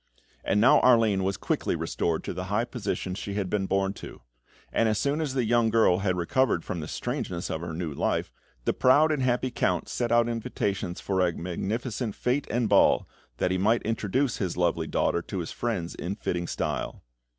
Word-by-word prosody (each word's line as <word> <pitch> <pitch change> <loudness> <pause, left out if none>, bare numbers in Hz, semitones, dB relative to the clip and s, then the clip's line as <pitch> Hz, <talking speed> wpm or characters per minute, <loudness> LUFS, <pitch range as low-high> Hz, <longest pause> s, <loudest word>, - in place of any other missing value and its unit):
And 100 - +1
now 120 +4 +6
Arline 115 -6 +4
was 95 0 -1
quickly - - -1
restored 85 -2 -1
to - - -4
the 90 +1 -4
high 105 +5 0
position 105 -6 -3
she 100 +1 -5
had 95 -3 -2
been 100 -2 0
born 95 0 +1
to; - - -10 0.5
and 115 - +3
as 110 - +1
soon 145 +6 0
as 140 -4 -2
the 125 -3 +1
young 120 0 +3
girl 110 -5 +4
had 95 -2 0
recovered 90 - +1
from 90 - -3
the 75 - -5
strangeness 90 0 -3
of 80 - -3
her 85 -1 -5
new 80 -2 -4
life, - - -1 0.3
the - - +2
proud 150 +5 +4
and 150 -3 0
happy 125 0 +1
Count - - 0
sent 120 -1 -1
out 120 0 +4
invitations 105 -5 -2
for 95 -2 0
a 90 -1 +3
magnificent 105 +7 -3
fête 130 +3 0
and 120 0 +1
ball, - - +4 0.3
that 90 - 0
he 95 - 0
might 110 +5 +2
introduce 115 +4 0
his 95 -4 -2
lovely 85 -2 +1
daughter 85 - +1
to 95 - -6
his 85 -3 -4
friends 105 -8 -3
in 90 +4 -4
fitting 85 -4 -2
style. - - -3
105 Hz, 200 wpm, -27 LUFS, 90-120 Hz, 0.5 s, now